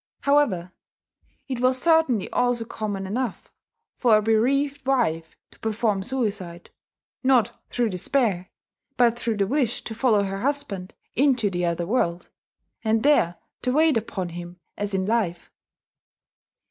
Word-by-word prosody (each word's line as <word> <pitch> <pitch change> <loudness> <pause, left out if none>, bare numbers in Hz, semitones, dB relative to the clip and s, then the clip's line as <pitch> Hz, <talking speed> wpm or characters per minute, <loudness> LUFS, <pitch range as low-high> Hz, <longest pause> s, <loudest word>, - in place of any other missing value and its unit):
However, 220 -12 +2 0.7
it 260 -3 -3
was 255 +1 +2
certainly 320 - +3
also 245 -2 +1
common 205 -3 -4
enough 230 +3 -4 0.4
for 230 -4 +4
a - - +2
bereaved 275 +6 +1
wife 165 -12 0
to - - -22
perform 215 -2 0
suicide, 200 -7 -4 0.5
not 260 -3 +2
through 240 -2 0
despair, 190 -1 0 0.5
but 235 -2 +4
through 230 -2 -1
the 200 - +2
wish 250 +1 0
to 225 - -6
follow 220 -3 +2
her 195 0 -4
husband 260 -10 -2 0.2
into 250 -6 +2
the 175 -1 -1
other 170 0 -1
world, 175 -5 -1 0.5
and 220 0 +1
there 270 - +3 0.3
to 250 - 0
wait 315 +1 +4
upon 195 -5 -2
him 175 +1 -8 0.2
as 205 -1 -2
in 190 0 0
life. 205 -6 -1
225 Hz, 135 wpm, -24 LUFS, 190-255 Hz, 0.7 s, for